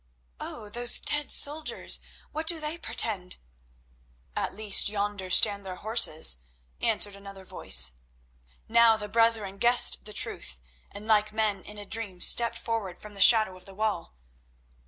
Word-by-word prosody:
"Oh, 210 - -8
those 240 +3 0
dead 295 -1 -1
soldiers—what 310 +1 -1
do 335 -1 +1
they 305 +1 -4
portend?" 185 - -2 1.0
"At - - -4
least 210 -1 +3
yonder 205 -2 -5
stand 200 +1 +3
their 185 -1 -8
horses," 180 - +1 0.4
answered 210 -3 0
another 195 -1 -13
voice. - - +1 0.8
Now 230 0 +4
the 210 -1 -5
brethren 220 -3 -1
guessed 240 +2 +5
the 210 - -8
truth, 65 - -4 0.3
and, 205 +1 -10
like 215 -1 +1
men 215 -3 -1
in 210 - -9
a 205 - -8
dream, 205 -4 -3
stepped 235 +5 +3
forward 215 -6 -5
from 210 0 -13
the 200 - -8
shadow 215 -3 +6
of 185 0 -16
the 195 - -10
wall. 210 - -4
210 Hz, 145 wpm, -26 LUFS, 195-230 Hz, 1.0 s, shadow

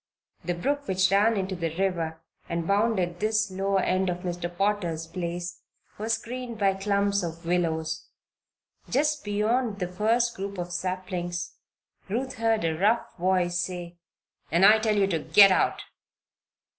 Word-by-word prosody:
The 175 +1 -2
brook 285 +10 -2
which 190 0 +2
ran 210 +3 +4
into 190 -1 -2
the 165 -2 -3
river, 165 -4 -1 0.3
and 170 0 -2
bounded 200 -4 +1
this 215 -1 +1
lower 195 +1 0
end 185 0 +1
of 180 0 -3
Mr. 175 -1 -3
Potter's 185 -5 0
place, 175 +1 -5 0.4
was 220 +2 0
screened 245 0 -5
by 200 -2 +3
clumps 200 +1 +1
of 165 -1 -6
willows. 165 -2 -1 0.8
Just 300 +3 +1
beyond 215 +2 0
the 180 -3 -2
first 225 +6 +1
group 200 +1 -5
of 175 0 -4
saplings 180 -1 -3 0.6
Ruth 255 +5 -2
heard 225 -2 +2
a 160 -1 0
rough 210 +8 +1
voice 180 -1 +1
say: 175 -1 -5 0.5
"And 170 +4 +5
I 215 +2 +7
tell 215 -1 +1
you 200 - +4
to 175 -4 0
git 190 +6 +7
out! 185 - +1
190 Hz, 150 wpm, -27 LUFS, 175-210 Hz, 0.8 s, I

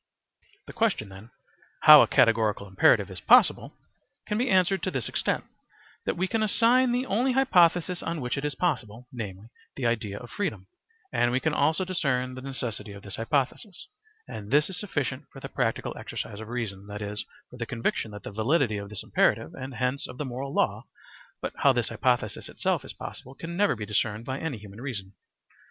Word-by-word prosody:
The - - -10
question 210 - 0
then, 95 +4 -12 0.5
"How - - +11
a - - +4
categorical 110 -3 +3
imperative 95 0 +4
is - - -7
possible," - - +5 0.5
can 210 - -2
be 255 +2 +1
answered 190 -1 +3
to 185 - -1
this 130 -9 -3
extent, - - -1 0.6
that - - 0
we 185 +2 +1
can 225 +2 0
assign 240 +4 +4
the 250 +2 0
only 250 +4 +1
hypothesis 180 -8 +3
on 170 - -3
which 125 -2 -2
it 140 - -4
is 145 -2 -2
possible, 125 - -2
namely, 105 -2 -7 0.3
the 130 - -3
idea 110 -4 -1
of 120 - -10
freedom; 110 - -3 0.5
and 120 - +2
we 125 - +2
can 160 +2 0
also 160 +6 +2
discern 130 -8 0
the 130 - -8
necessity 125 -6 -5
of 100 0 -11
this 100 -1 -6
hypothesis, 140 - -2 0.4
and 105 -1 -8
this 150 +6 +3
is 180 - -5
sufficient 145 -10 -3
for - - -11
the - - -7
practical - - -1
exercise 100 - -6
of 110 - -7
reason, 105 -5 -4
that 105 0 -6
is, 105 +1 -3 0.3
for 125 - -11
the 115 -2 -4
conviction 115 -3 -2
of 105 - -9
the - - -6
validity 115 +1 +1
of 100 0 -6
this 105 - -5
imperative, - - +1
and 130 0 -7
hence 125 +3 0
of 125 - -10
the 150 - -3
moral 130 +2 -5
law; - - +1 0.6
but - - -3
how - - +5
this - - 0
hypothesis - - 0
itself - - -1
is - - -7
possible 130 +2 -9
can 170 +3 -6
never 205 -3 +3
be 105 -2 -5
discerned 105 +1 -1
by 130 +1 -3
any 160 -7 -3
human 105 +1 -11
reason. 100 -8 -5
125 Hz, 195 wpm, -27 LUFS, 105-170 Hz, 0.6 s, How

